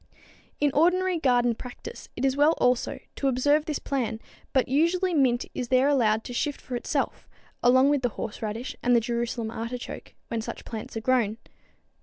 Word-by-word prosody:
In 290 Hz, -1 st, +3 dB
ordinary 360 Hz, +3 st, +3 dB
garden 245 Hz, -4 st, +3 dB
practice 250 Hz, -, -9 dB
it -, -, -1 dB
is 265 Hz, -1 st, +2 dB
well 295 Hz, +3 st, +5 dB
also 250 Hz, -1 st, +1 dB, 0.2 s
to 275 Hz, -, 0 dB
observe 290 Hz, +4 st, +3 dB
this 305 Hz, -3 st, -2 dB
plan, 235 Hz, -5 st, -2 dB, 0.3 s
but 260 Hz, -, +2 dB
usually 340 Hz, +7 st, +2 dB
mint 260 Hz, -5 st, +2 dB
is 250 Hz, -, -3 dB
there 255 Hz, +2 st, +4 dB
allowed 225 Hz, -6 st, +3 dB
to 245 Hz, -, -7 dB
shift 290 Hz, +4 st, -1 dB
for 250 Hz, -, -6 dB
itself, 240 Hz, -, -2 dB, 0.3 s
along 260 Hz, +3 st, +5 dB
with 290 Hz, -2 st, +2 dB
the 245 Hz, -, +1 dB
horseradish 220 Hz, +3 st, -4 dB
and 245 Hz, 0 st, +3 dB
the -, -, +6 dB
Jerusalem 235 Hz, -1 st, -2 dB
artichoke 235 Hz, +2 st, -6 dB
when 230 Hz, -1 st, -2 dB
such -, -, -7 dB
plants 225 Hz, 0 st, -6 dB
are -, -, -3 dB
grown. 225 Hz, -3 st, +1 dB
255 Hz, 175 wpm, -26 LUFS, 235-290 Hz, 0.3 s, the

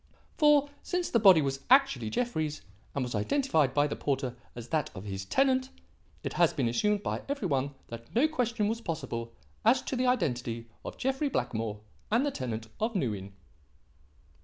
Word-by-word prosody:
For, 295 Hz, -1 st, +4 dB
since 360 Hz, -1 st, -2 dB
the 235 Hz, -, +4 dB
body 190 Hz, -7 st, +7 dB
was 135 Hz, -1 st, -1 dB
actually 250 Hz, -, +4 dB
Jeffrey's, 155 Hz, -, -2 dB, 0.3 s
and 140 Hz, -, 0 dB
was 125 Hz, -, -5 dB
identified 155 Hz, -, +2 dB
by 145 Hz, 0 st, +4 dB
the 150 Hz, -, -2 dB
porter 135 Hz, -3 st, -2 dB, 0.2 s
as 120 Hz, -1 st, -8 dB
that 155 Hz, -3 st, 0 dB
of 95 Hz, -, -7 dB
his 95 Hz, -2 st, -5 dB
tenant, 260 Hz, -, +2 dB, 0.5 s
it -, -, -3 dB
has 170 Hz, -2 st, +3 dB
been 135 Hz, -6 st, 0 dB
assumed 205 Hz, -, +1 dB
by -, -, -2 dB
every 280 Hz, -8 st, -1 dB
one 140 Hz, -2 st, -1 dB
that 115 Hz, -, -10 dB
no 265 Hz, +7 st, +5 dB
question 240 Hz, -8 st, 0 dB
was 225 Hz, +2 st, -2 dB
possible 120 Hz, -, -4 dB, 0.3 s
as 250 Hz, +4 st, +4 dB
to -, -, -3 dB
the 255 Hz, 0 st, +1 dB
identity 125 Hz, -, 0 dB, 0.2 s
of -, -, -7 dB
Jeffrey 270 Hz, +2 st, 0 dB
Blackmore 110 Hz, -, -2 dB, 0.3 s
and 235 Hz, +6 st, +3 dB
the 290 Hz, -, 0 dB
tenant 115 Hz, -, -4 dB
of 225 Hz, +1 st, -1 dB
New 130 Hz, -, +1 dB
Inn." 100 Hz, -1 st, -8 dB
155 Hz, 180 wpm, -30 LUFS, -, 0.5 s, body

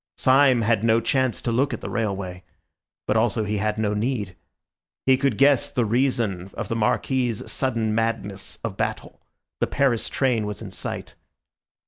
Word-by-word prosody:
Syme 130 Hz, -2 st, +4 dB
had 110 Hz, -1 st, +2 dB
no 115 Hz, 0 st, +4 dB
chance 130 Hz, +1 st, 0 dB
to 120 Hz, -, 0 dB
look 135 Hz, +5 st, +1 dB
at -, -, -12 dB
the -, -, -5 dB
railway; 95 Hz, -5 st, -3 dB, 0.6 s
but 105 Hz, -, 0 dB
also 110 Hz, 0 st, +2 dB
he 105 Hz, 0 st, -1 dB
had 105 Hz, +1 st, -1 dB
no 105 Hz, -1 st, 0 dB
need. 105 Hz, -4 st, -2 dB, 0.7 s
He 130 Hz, -, +6 dB
could 130 Hz, -4 st, 0 dB
guess 140 Hz, -1 st, +4 dB
the 120 Hz, -, 0 dB
reason 110 Hz, -6 st, 0 dB
of -, -, -5 dB
the 115 Hz, -, -1 dB
Marquis's 120 Hz, +1 st, 0 dB
sudden 115 Hz, -5 st, 0 dB
madness 110 Hz, -4 st, -2 dB
of -, -, -4 dB
battle—the -, -, -5 dB
Paris 135 Hz, -5 st, +1 dB
train 120 Hz, -6 st, +1 dB
was 105 Hz, -, -5 dB
in -, -, -8 dB
sight. -, -, -5 dB
115 Hz, 160 wpm, -24 LUFS, 105-130 Hz, 0.7 s, He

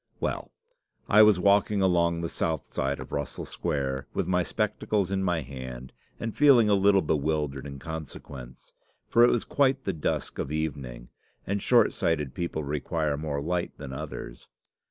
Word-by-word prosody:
Well, -, -, -3 dB, 0.6 s
I 105 Hz, +1 st, +7 dB
was 105 Hz, -4 st, +6 dB
walking 100 Hz, +2 st, +3 dB
along 85 Hz, -2 st, +2 dB
the 85 Hz, -, -1 dB
south 80 Hz, -2 st, -3 dB
side 70 Hz, +1 st, -1 dB
of -, -, -9 dB
Russell 70 Hz, 0 st, -4 dB
Square, 65 Hz, -2 st, -2 dB
with -, -, 0 dB
my 90 Hz, -1 st, +2 dB
spectacles 95 Hz, +4 st, -1 dB
in 95 Hz, 0 st, 0 dB
my 90 Hz, -3 st, +1 dB
hand, 65 Hz, -2 st, -8 dB, 0.3 s
and 115 Hz, -1 st, -4 dB
feeling 135 Hz, -7 st, +6 dB
a -, -, +5 dB
little 100 Hz, 0 st, +4 dB
bewildered 75 Hz, -2 st, -1 dB
in 70 Hz, 0 st, -7 dB
consequence 70 Hz, -5 st, -8 dB, 0.3 s
for 120 Hz, -, +5 dB
it 120 Hz, -, +7 dB
was 120 Hz, -, 0 dB
quite 135 Hz, -1 st, +2 dB
the 95 Hz, -, -1 dB
dusk 80 Hz, -, -2 dB
of -, -, -1 dB
the 75 Hz, +3 st, -2 dB
evening, 65 Hz, -6 st, -5 dB, 0.4 s
and 100 Hz, +1 st, -1 dB
short 120 Hz, -3 st, +4 dB
sighted 80 Hz, -8 st, -1 dB
people 85 Hz, -3 st, -3 dB
require 75 Hz, +1 st, -1 dB
more 70 Hz, -1 st, -3 dB
light 85 Hz, +2 st, -2 dB
than 70 Hz, -2 st, -7 dB
others. -, -, -7 dB
80 Hz, 170 wpm, -27 LUFS, 70-100 Hz, 0.6 s, I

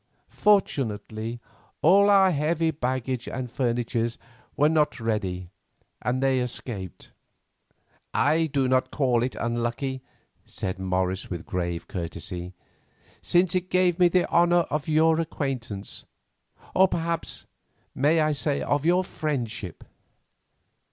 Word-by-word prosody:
Fortunately, 115 Hz, -, 0 dB, 0.4 s
all 200 Hz, +5 st, +6 dB
our 195 Hz, -2 st, +6 dB
heavy 160 Hz, +1 st, +1 dB
baggage 130 Hz, -3 st, -2 dB
and 130 Hz, -2 st, -5 dB
furniture 120 Hz, -2 st, 0 dB, 0.5 s
were 145 Hz, -, +5 dB
not 155 Hz, -3 st, +1 dB
ready, 95 Hz, -6 st, -2 dB, 0.5 s
and 130 Hz, +2 st, -1 dB
escaped." 125 Hz, -, -2 dB, 1.0 s
"I 160 Hz, +2 st, +2 dB
do 135 Hz, -3 st, 0 dB
not 130 Hz, 0 st, +2 dB
call 125 Hz, -5 st, +1 dB
it 125 Hz, +1 st, -2 dB
unlucky," 120 Hz, +3 st, -2 dB, 0.4 s
said 95 Hz, 0 st, -4 dB
Morris 95 Hz, 0 st, -1 dB
with 85 Hz, -3 st, -5 dB
grave 85 Hz, -2 st, -3 dB
courtesy, 90 Hz, +1 st, -5 dB, 0.7 s
"since 175 Hz, 0 st, +2 dB
it 185 Hz, 0 st, -1 dB
gave 180 Hz, -1 st, +2 dB
me 180 Hz, -, +7 dB
the 180 Hz, +1 st, +2 dB
honour 175 Hz, 0 st, +4 dB
of 150 Hz, +2 st, -2 dB
your 160 Hz, +1 st, +4 dB
acquaintance; 130 Hz, -10 st, -4 dB, 0.7 s
or 190 Hz, +1 st, +6 dB
perhaps 170 Hz, -2 st, -3 dB
I -, -, -43 dB, 0.5 s
may 155 Hz, +2 st, +3 dB
say 145 Hz, 0 st, -1 dB
of 145 Hz, -1 st, 0 dB
your 175 Hz, +3 st, +3 dB
friendship." 120 Hz, -, -4 dB
130 Hz, 115 wpm, -26 LUFS, 115-165 Hz, 1.0 s, me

